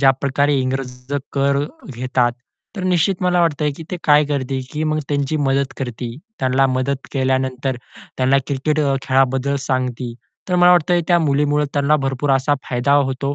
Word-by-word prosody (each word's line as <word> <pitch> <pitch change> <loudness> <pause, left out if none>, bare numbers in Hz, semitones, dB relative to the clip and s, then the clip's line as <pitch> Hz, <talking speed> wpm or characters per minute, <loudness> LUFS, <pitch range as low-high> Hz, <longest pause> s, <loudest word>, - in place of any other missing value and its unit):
ज्याप्रकारे 140 +1 +2
इंग्रज 130 0 -4 0.2
कर 140 0 +2 0.4
घेतात. 125 0 +1 0.4
तर 190 - -4
निश्चित 185 +1 +1
मला 180 -1 +2
वाटतंय 150 -3 +1
की - - -8
ती 180 - -2
काय 150 0 +5
करते 135 -2 -2
की 150 - -2
मग 155 0 0
त्यांची 140 +1 0
मदत 135 -2 0
करते, 120 -2 -5 0.2
त्यांना 130 +1 +2
मदत 130 +1 -2
केल्यानंतर, 130 0 0 0.4
त्यांना 130 +1 +3
क्रिकेट 150 +2 0 0.2
खेळाबद्दल 135 +1 +1
सांगते. 125 -2 -2 0.4
तर 180 - 0
मला 180 0 +6
वाटत 175 -1 +3 0.2
त्या 175 -1 +5
मुलीमुळं 145 -1 +1
त्यांना 145 +1 +3
भरपूर 135 +1 -1
असा 135 +2 +2
फायदा 125 +2 +1 0.2
होतो 140 +2 -2
135 Hz, 155 wpm, -19 LUFS, 130-150 Hz, 0.4 s, मला